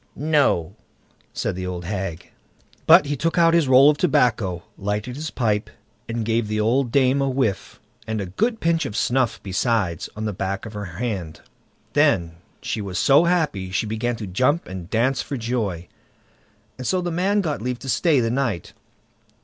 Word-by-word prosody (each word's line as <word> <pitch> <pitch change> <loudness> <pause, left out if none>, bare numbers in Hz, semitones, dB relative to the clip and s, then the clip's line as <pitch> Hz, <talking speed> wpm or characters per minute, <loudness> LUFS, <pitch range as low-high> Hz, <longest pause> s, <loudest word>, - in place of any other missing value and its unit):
"No!" 145 - +1 0.6
said - - -3
the 90 0 -4
old 90 -1 -5
hag. 95 -3 -5 0.6
But - - +8
he 145 +1 -2
took 165 +5 -1
out 165 -1 +5
his 170 -4 +3
roll 130 +2 +7
of 150 - -4
tobacco, 115 - +1
lighted 105 +5 -3
his 155 +2 -4
pipe, 110 -6 -1 0.4
and 115 -1 -2
gave 115 0 0
the 110 0 -2
old 120 +3 +1
dame 135 +1 +3
a 135 - +1
whiff, 130 -7 -2 0.3
and 110 -1 -2
a 100 - -2
good 225 - -1
pinch 165 0 +1
of 105 - -7
snuff 125 0 +1
besides, 95 -3 -1
on 110 +1 -4
the 105 - -2
back 95 +1 -3
of 110 - -8
her 105 -1 -5
hand. 95 -3 -5 0.5
Then 85 -3 +2 0.3
she 110 - -2
was 95 -2 -5
so 145 +5 +5
happy 160 - 0
that 95 - -10
she 105 - 0
began 110 +3 -2
to 110 - -6
jump 130 - +1
and 90 -1 -7
dance 125 +4 +1
for 140 - -5
joy, 110 -8 -3 0.9
and 130 - -4
so 185 - +1
the 175 -1 -2
man 195 +5 +1
got 155 - -3
leave 125 +1 -2
to 135 - -10
stay 145 +5 +3
the 115 -1 0
night. 120 - -2
115 Hz, 185 wpm, -22 LUFS, 100-140 Hz, 0.9 s, But